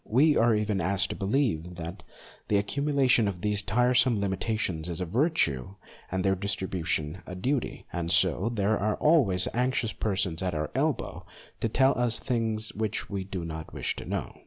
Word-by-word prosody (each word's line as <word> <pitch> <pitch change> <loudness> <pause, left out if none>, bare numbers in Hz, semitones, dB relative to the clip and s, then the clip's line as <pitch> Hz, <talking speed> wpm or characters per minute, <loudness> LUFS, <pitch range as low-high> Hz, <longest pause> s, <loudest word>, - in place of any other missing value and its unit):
We 145 +7 +4
are 115 -1 +4
even 105 -2 0
asked 95 +2 +1
to - - -4
believe 95 - 0
that 85 +3 -7 0.5
the 105 - +1
accumu 140 +9 0
lation 130 -5 +4
of 90 -3 -4
these 105 0 +1
tiresome 125 +2 +3
limitations 95 -4 -1
is 85 - -3
a 90 - -1
virtue 95 - 0 0.4
and 95 0 -1
their 95 - +4
distribution 95 -4 -2
a 90 - -6
duty, 125 +7 -2
and 85 -1 -2
so 90 +4 +3
there 105 -1 +1
are 105 +1 0
always 120 - +3
anxious 125 -2 0
persons 95 -5 -1
at 90 -3 -1
our 75 0 -2
elbow - - -2 0.3
to 115 - 0
tell 130 +4 +3
us 120 -2 +3
things 115 -3 -1
which 110 0 -3
we 100 -1 -2
do 95 -2 -5
not 80 -1 -7
wish - - -2
to - - -7
know. - - -4
100 Hz, 180 wpm, -28 LUFS, 90-120 Hz, 0.5 s, We